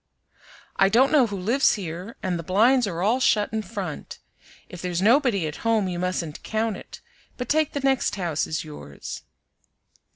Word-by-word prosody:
"I 195 - +5
don't 250 +6 +4
know 280 -6 +5
who 205 - -5
lives 230 +9 +3
here, 185 +4 -6
and 180 -2 -1
the - - -5
blinds 225 +7 +3
are 175 -2 -3
all 230 +6 +2
shut 210 -4 +2
in 220 - 0
front. 200 -7 -6 0.5
If 175 - -9
there's 180 -2 -2
nobody 225 - +3
at 155 0 -5
home 225 -4 +1
you 175 -1 -3
mustn't 180 -4 -3
count 220 -1 -1
it, - - -11 0.4
but 250 - -4
take 310 +2 +1
the 285 - -2
next 270 -4 +1
house 170 -6 -1
as 155 - -2
yours." 145 - -8
200 Hz, 175 wpm, -24 LUFS, 175-240 Hz, 0.5 s, I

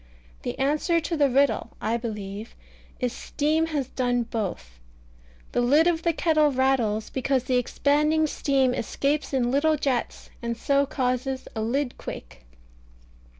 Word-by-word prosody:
The - - -4
answer 305 +5 +2
to 330 +1 -3
the 290 -3 +3
riddle, 275 +2 +1
I 220 +2 0
believe, 210 -2 -5 0.4
is 250 -2 -1
Steam 310 +4 0
has 290 -5 -2
done 245 -2 0
both. 185 - -5 0.7
The - - +1
lid 285 +7 +4
of 340 -2 +2
the 335 - +2
kettle 310 -2 +3
rattles, 255 -5 +1
because 265 -1 0
the 255 -1 +1
expanding 300 +5 +2
steam 270 -4 +1
escapes 280 +6 -1
in 250 -3 +1
little 305 +3 +3
jets, 270 -4 -2
and 235 -1 -3
so 280 +3 +2
causes 260 -1 -2
a 220 - -2
lid 245 +4 -1
quake. - - -8
265 Hz, 145 wpm, -25 LUFS, 240-295 Hz, 0.7 s, lid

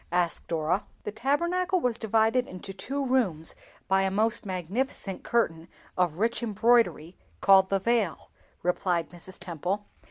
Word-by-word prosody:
asked 175 -1 0
Dora. 165 +4 0 0.2
"The - - -4
Tabernacle 345 - +1
was 245 -6 -1
divided 225 +3 +2
into 185 +2 -8
two 275 +8 -3
rooms 205 -12 0 0.3
by 190 0 +3
a 195 - +1
most 220 +3 0
magnificent 190 - -3
curtain 165 -9 0 0.3
of 175 -4 +1
rich 230 +6 0
embroidery 225 -6 +2 0.2
called 190 -1 +6
the 195 - +2
'Veil,'" 215 -4 0 0.3
replied 175 -3 0
Mrs. 175 +2 -12
Temple. 180 +4 -3
195 Hz, 135 wpm, -27 LUFS, 180-235 Hz, 0.3 s, called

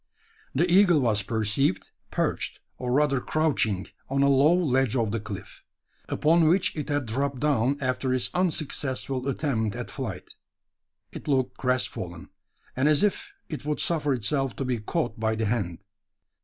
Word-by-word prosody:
The 170 +7 +3
eagle 180 -2 +5
was 110 -6 +2
perceived, 110 - 0 0.2
perched, - - -1 0.2
or 125 -1 -2
rather 140 -1 +2
crouching, 125 -13 0 0.2
on 140 +1 +2
a 140 - +4
low 140 +3 +5
ledge 135 -8 +1
of 115 -4 +1
the 115 - -1
cliff, 105 -2 -8 0.5
upon 165 +1 +3
which 180 +4 +3
it 150 -2 -4
had 145 -2 0
dropped 135 +4 -2
down 140 -1 +2
after 130 -1 -1
its 130 -1 0
unsuccessful 140 -6 -1
attempt 120 -7 -1
at - - -5
flight. - - -6 0.8
It - - -9
looked 130 -3 +1
crestfallen, 95 -9 -2 0.4
and 130 +3 +2
as 150 +3 +4
if 210 - 0 0.2
it 155 - -6
would 150 0 -2
suffer 155 -4 +1
itself 130 +3 -1
to 135 - -3
be 125 -2 -1
caught 120 +1 -2
by 110 0 +1
the 110 0 -1
hand. 100 -5 -2
135 Hz, 155 wpm, -26 LUFS, 115-150 Hz, 0.8 s, eagle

